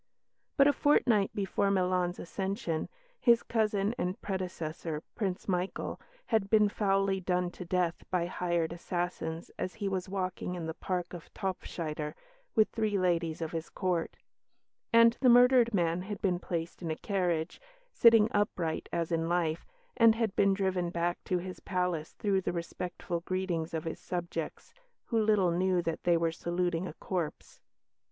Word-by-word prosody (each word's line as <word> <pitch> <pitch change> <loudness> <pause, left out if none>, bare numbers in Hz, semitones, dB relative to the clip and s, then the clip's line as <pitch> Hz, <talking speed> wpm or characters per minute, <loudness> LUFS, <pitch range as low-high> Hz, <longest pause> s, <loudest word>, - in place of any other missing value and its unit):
But 275 - +7
a 290 - +5
fortnight 235 -10 +3
before 200 0 0
Milan's 180 -2 +1
accession, 190 -3 -3 0.3
his 235 -2 +5
cousin 215 -2 +1
and 180 -2 -2
predecessor, 170 -5 -4
Prince 190 -5 -3
Michael, 180 0 -2 0.2
had 220 -4 +1
been 215 -1 +5
foully 195 -1 +1
done 180 -1 0
to 180 - -8
death 175 -1 +1 0.2
by 180 -2 +1
hired 175 -2 -1
assassins 175 -1 -3
as 185 - -3
he 210 -3 -3
was 190 -1 -2
walking 185 -1 -3
in 170 -2 -4
the 160 - -3
park 180 +1 -3
of 175 -2 -9
Topfschider, 160 -6 -4 0.4
with 215 - +5
three 215 -3 0
ladies 170 -3 0
of 160 - -4
his 165 -1 -4
Court; 180 -4 -1 0.7
and 230 0 +6
the 255 - +6
murdered 245 0 +6
man 175 -3 +1
had 200 +2 -5
been 180 -3 +1
placed 170 -1 -4
in 170 - -3
a 160 - -1
carriage, 175 -5 -1 0.3
sitting 225 -2 +7
upright 180 -6 -1
as 170 0 -1
in 165 0 0
life, 170 -2 0 0.3
and 230 -2 +6
had 225 -4 -1
been 200 -1 +4
driven 190 -3 0
back 175 0 -1
to 180 - +1
his 185 +1 -6
palace 180 -4 -2
through 195 -2 0
the - - -1
respectful 175 0 -4
greetings 175 -2 -2
of 160 -1 -3
his 165 - -5
subjects, 170 -3 -5 0.3
who 230 - +1
little 210 -5 +3
knew 180 +1 +2
that 165 -2 -3
they 175 -1 +4
were 165 0 +1
saluting 175 +1 -1
a - - -7
corpse. 175 -5 -4
180 Hz, 160 wpm, -31 LUFS, 170-200 Hz, 0.7 s, But